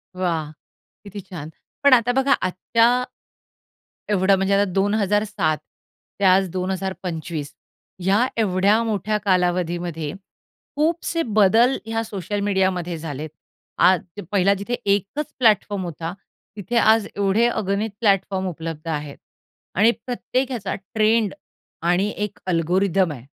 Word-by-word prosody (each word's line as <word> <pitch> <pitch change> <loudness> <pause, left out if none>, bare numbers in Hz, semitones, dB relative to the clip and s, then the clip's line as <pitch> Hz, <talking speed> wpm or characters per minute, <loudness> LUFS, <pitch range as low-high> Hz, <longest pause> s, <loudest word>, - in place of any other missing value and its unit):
वाह! 165 -5 -1 0.5
किती 200 0 -8
छान. 175 -5 -8 0.3
पण 280 -2 +7
आता 245 -1 +4
बघा 270 +2 +3
आजच्या 230 +7 +2 1.1
एवढं 195 -1 +4
म्हणजे 195 +1 0
आता 200 -1 +2
2007 205 -4 +1 0.6
ते - - -3
आज 190 +1 +5
2025 180 -4 -4 0.5
ह्या 200 +6 +3 0.2
एवढ्या 200 +2 +3
मोठ्या 215 -1 -1
कालावधीमध्ये 175 -4 0 0.6
खूपसे 330 +2 0 0.2
बदल 225 +6 +5
ह्या 225 0 -2
सोशल 205 -2 -4
मीडियामध्ये 190 -4 0
झालेत. 155 -1 -6 0.5
आद 185 -2 +5 0.3
पहिला 195 0 +3
जिथे 200 +4 -5
एकच 200 +9 0
प्लॅटफॉर्म 210 -4 +2
होता, 165 0 -5 0.4
तिथे 210 +4 -4
आज 220 -2 +4
एवढे 200 +3 +2
अगणित 210 -1 -1
प्लॅटफॉर्म 195 -3 +1
उपलब्ध 165 -2 -6
आहेत 150 -2 -4 0.6
आणि 215 +5 +5
प्रत्येक 255 +1 -2
ह्याचा 215 -7 -3
ट्रेंड 215 +2 +1 0.6
आणि 185 +4 +2
एक 210 -1 -4
अल्गोरिदम 180 +1 +1
आहे. 125 -4 -9
195 Hz, 115 wpm, -22 LUFS, 180-215 Hz, 1.1 s, पण